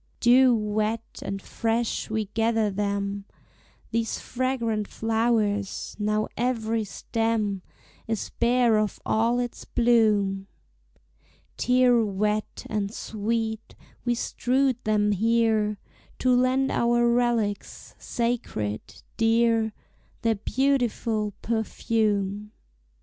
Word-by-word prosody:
Dew 250 +1 +6
wet 215 +1 -2
and 195 0 -4
fresh 230 0 -1
we 220 0 -1
gather 225 -2 +1
them, 200 0 -2 0.7
These 230 -1 -1
fragrant 235 -5 -2
flowers; 220 -3 0
now 210 +1 0
every 230 -2 0
stem 215 -2 -1 0.5
Is 225 -3 -3
bare 235 -2 +4
of 215 -1 -2
all 230 +3 +2
its 245 -1 -4
bloom: 210 -5 +2 1.1
Tear 250 -1 +4
wet 210 +1 -2
and 205 -2 -2
sweet 220 +1 -3 0.3
we 240 -1 +1
strewed 255 +1 0
them 210 -1 +2
here 220 0 +2 0.4
To 255 -1 +3
lend 255 +2 +2
our 240 0 +2
relics, 235 -4 0
sacred, 230 - -3
dear, 225 -1 +3 0.5
Their 230 -1 +3
beautiful 230 -3 0
perfume. 210 -2 -1
225 Hz, 95 wpm, -26 LUFS, 210-235 Hz, 1.1 s, Dew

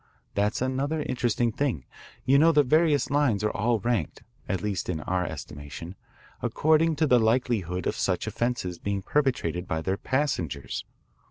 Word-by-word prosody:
That's 105 +4 0
another 140 +4 -1
interesting 120 -2 0
thing. 115 - -1 0.4
You 135 +2 +5
know 165 +2 +6
the 150 -2 +5
various 150 +1 +3
lines 135 -8 +2
are 105 - +1
all 115 +2 +1
ranked, 115 -8 -1 0.3
at 95 -3 -1
least 100 -4 -2
in 80 -4 -2
our 90 +2 -1
estimation, 75 +4 -8 0.5
according 160 +1 +2
to 155 - +2
the 125 -4 +5
likelihood 110 -7 0
of - - 0
such - - 0
offences 115 -8 -2
being 100 -1 -2
perpetrated 100 - 0
by 80 0 -1
their 95 +3 -1
passengers. 130 - -2
120 Hz, 155 wpm, -27 LUFS, 90-140 Hz, 0.5 s, know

